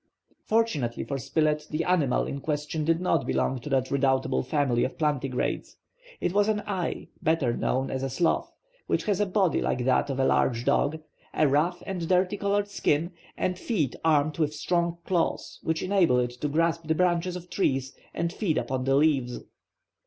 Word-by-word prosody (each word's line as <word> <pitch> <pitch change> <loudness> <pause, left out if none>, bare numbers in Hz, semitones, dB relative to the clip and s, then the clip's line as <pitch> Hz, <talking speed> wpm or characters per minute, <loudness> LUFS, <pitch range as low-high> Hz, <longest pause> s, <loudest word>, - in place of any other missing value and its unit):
Fortunately 165 - 0
for 140 -1 -3
Spilett, 150 +2 0
the 155 +2 -1
animal 165 -8 +2
in 140 - -5
question 150 +1 -2
did 165 +2 +2
not 180 - +1
belong 130 - 0
to 135 - -8
that 130 -2 0
redoubtable 130 - +1
family 130 - +1
of 130 - -3
plantigrades. 140 -4 -1 0.4
It 175 - -1
was 205 +1 +3
an 210 -1 0
ai, 190 -5 -3
better 155 -7 +1
known 130 +1 -1
as 130 - -2
a 135 - -2
sloth, 160 +6 0 0.4
which - - 0
has 205 -2 0
a 205 - +2
body 190 -2 +2
like 125 -1 -1
that 130 +2 +2
of 135 -1 -2
a 135 - +3
large 120 -2 +2
dog, 150 +3 +2 0.4
a 155 - +4
rough 160 +6 +1
and 180 -4 -3
dirty 185 +1 +2
colored 200 0 0
skin, 170 -4 0 0.3
the 185 - 0
feet 180 - -1
armed 155 -1 +2
with 155 -1 0
strong 170 +2 0
claws 175 -3 -1
which 160 0 -1
enable 185 -9 +3
it 120 -1 +1
to 125 +5 -4
grasp 165 +2 0
the 160 - +2
branches 180 0 +1
of 180 -1 -8
trees 135 -8 0 0.2
and 170 +1 -2
feed 180 -8 0
upon 130 -1 -2
the 135 0 +3
leaves. 140 -5 +2
155 Hz, 180 wpm, -27 LUFS, 135-180 Hz, 0.4 s, a